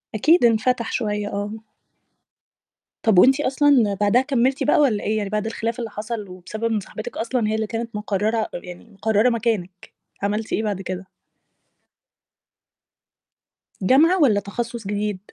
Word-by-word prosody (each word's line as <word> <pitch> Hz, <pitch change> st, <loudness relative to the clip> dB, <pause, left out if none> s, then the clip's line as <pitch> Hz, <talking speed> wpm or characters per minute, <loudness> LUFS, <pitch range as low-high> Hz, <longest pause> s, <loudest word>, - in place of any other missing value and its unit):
أكيد 310 Hz, -, +4 dB
انفتح 235 Hz, +1 st, +1 dB
شوية، 210 Hz, -3 st, -2 dB
آه. 205 Hz, +1 st, -3 dB, 1.5 s
طب 215 Hz, -5 st, +5 dB
وأنتِ 265 Hz, +7 st, +5 dB
أصلًا 270 Hz, -6 st, +3 dB
بعدها 210 Hz, +5 st, +4 dB
كمّلتِ 265 Hz, -1 st, +1 dB
بقى، 295 Hz, -, +3 dB
والّا 245 Hz, -8 st, +2 dB
إيه 215 Hz, +1 st, 0 dB
يعني؟ 205 Hz, -2 st, -2 dB
بعد 210 Hz, +1 st, -2 dB
الخلاف 230 Hz, +2 st, -3 dB
اللي 230 Hz, -2 st, -4 dB
حصل، 210 Hz, -1 st, -6 dB
وبسبب 185 Hz, +5 st, -8 dB
إن 215 Hz, -, +1 dB
صاحبتِك 215 Hz, +2 st, -8 dB
أصلًا 230 Hz, -1 st, -1 dB
هي 215 Hz, -, 0 dB
اللي 220 Hz, -1 st, -1 dB
كانت 230 Hz, 0 st, -5 dB
مقررة 210 Hz, +2 st, -1 dB
يعني 175 Hz, +2 st, -8 dB
مقررة 215 Hz, +3 st, +2 dB
مكانِك، 215 Hz, -6 st, -2 dB, 0.3 s
عملتِ 210 Hz, +2 st, -2 dB
إيه 220 Hz, -, 0 dB
بعد 205 Hz, -3 st, -2 dB
كده؟ 185 Hz, 0 st, -6 dB, 2.7 s
جامعة، 315 Hz, -, +4 dB
والّا 220 Hz, -8 st, +4 dB
تَخصُّص 230 Hz, +2 st, -5 dB
جديد؟ 205 Hz, -1 st, -2 dB
220 Hz, 140 wpm, -22 LUFS, 205-240 Hz, 2.7 s, طب